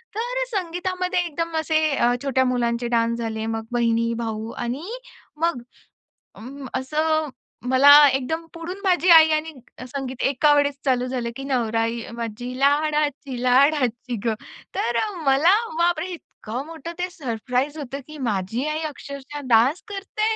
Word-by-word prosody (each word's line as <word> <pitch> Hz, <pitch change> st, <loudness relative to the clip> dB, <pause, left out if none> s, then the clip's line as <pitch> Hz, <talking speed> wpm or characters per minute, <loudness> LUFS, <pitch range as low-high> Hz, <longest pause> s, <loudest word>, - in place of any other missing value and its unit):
तर -, -, -1 dB
संगीतामध्ये 365 Hz, -1 st, -2 dB
एकदम 330 Hz, 0 st, -3 dB
असे 315 Hz, 0 st, +1 dB, 0.2 s
अ, 240 Hz, -2 st, +3 dB
छोट्या 265 Hz, -2 st, +2 dB
मुलांचे 240 Hz, -1 st, 0 dB
डान्स 230 Hz, 0 st, +1 dB
झाले, 220 Hz, -1 st, -3 dB
मग 225 Hz, 0 st, -5 dB
बहिणी, 230 Hz, -1 st, +1 dB
भाऊ 225 Hz, -1 st, -4 dB
आणि 250 Hz, +6 st, -4 dB, 0.6 s
मग 335 Hz, -7 st, +1 dB, 0.7 s
अं, 270 Hz, +4 st, -9 dB
असं 310 Hz, +3 st, 0 dB, 0.4 s
मला 265 Hz, +2 st, +7 dB, 0.2 s
एकदम 270 Hz, +5 st, -2 dB
पुढून 350 Hz, +4 st, -7 dB
माझी 365 Hz, -2 st, +2 dB
आई 320 Hz, -1 st, +9 dB
आणि 310 Hz, +1 st, 0 dB, 0.4 s
संगीत 260 Hz, -1 st, -5 dB
एकावेळेस 285 Hz, +1 st, +3 dB
चालू 250 Hz, -2 st, +2 dB
झालं, 250 Hz, -2 st, -3 dB
की 270 Hz, -, -7 dB
"नवराई 230 Hz, -3 st, 0 dB
माझी 235 Hz, +2 st, -5 dB
लाडाची 290 Hz, -2 st, +1 dB
लाडाची 255 Hz, -2 st, +2 dB
गं". 225 Hz, -2 st, +1 dB, 0.4 s
तर 235 Hz, -, -1 dB
अ, 425 Hz, -, -2 dB
मला, 280 Hz, +7 st, +5 dB, 0.3 s
बाप 345 Hz, -1 st, +2 dB
रे! 350 Hz, -, -3 dB, 0.4 s
इतकं 240 Hz, +5 st, -4 dB
मोठं 325 Hz, 0 st, -8 dB
ते 360 Hz, +1 st, -1 dB
सरप्राईज 260 Hz, -, -2 dB
होतं, 275 Hz, -2 st, -5 dB
की 305 Hz, 0 st, -10 dB
माझी 215 Hz, +4 st, -1 dB
आई 305 Hz, +1 st, -2 dB
अक्षरशः 280 Hz, 0 st, -8 dB
डान्स 250 Hz, +7 st, +4 dB
करते? 425 Hz, +2 st, -2 dB
275 Hz, 140 wpm, -23 LUFS, 240-320 Hz, 0.7 s, आई